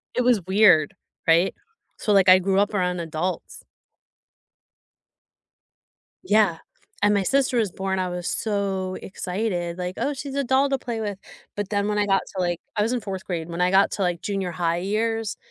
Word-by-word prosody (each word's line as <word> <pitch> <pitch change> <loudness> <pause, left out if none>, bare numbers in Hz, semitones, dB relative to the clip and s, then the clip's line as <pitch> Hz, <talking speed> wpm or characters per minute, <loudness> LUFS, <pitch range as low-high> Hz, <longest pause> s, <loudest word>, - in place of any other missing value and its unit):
It - - +2
was 245 -3 +4
weird, 190 -4 +5 0.3
right? 170 +3 +4 0.4
So 210 - 0
like 195 -2 +5
I 185 - +9
grew 190 +1 +1
up 205 +1 +1
around 180 -2 0
adults. 170 +2 -4 2.6
Yeah. 210 - +3 0.5
And 205 0 +5
my 200 -1 +2
sister 265 +3 +1
was 215 -5 +1
born, 190 +1 -2
I 185 -1 -1
was 180 0 -4
so 195 -3 -2
excited. 180 -3 -3
Like, 180 0 -4
"Oh, 290 - -1
she's 275 0 -6
a 280 - 0
doll 265 +2 +3
to 270 -1 0
play 235 -3 -4
with." 205 -3 -4 0.4
But 205 -1 -3
then 205 -1 0
when 210 0 0
I 205 - +1
got 195 -1 +3
to 185 - -1
like 175 -1 -1 0.2
I 210 - +1
was 220 +3 +1
in 250 -1 -1
fourth 195 -2 -5
grade. 170 -2 -4
When 170 +1 -3
I 180 - +3
got 195 +1 +4
to - - -4
like 175 -2 0
junior-high 180 -4 -1
years, 220 +3 -1
195 Hz, 185 wpm, -24 LUFS, 180-215 Hz, 2.6 s, I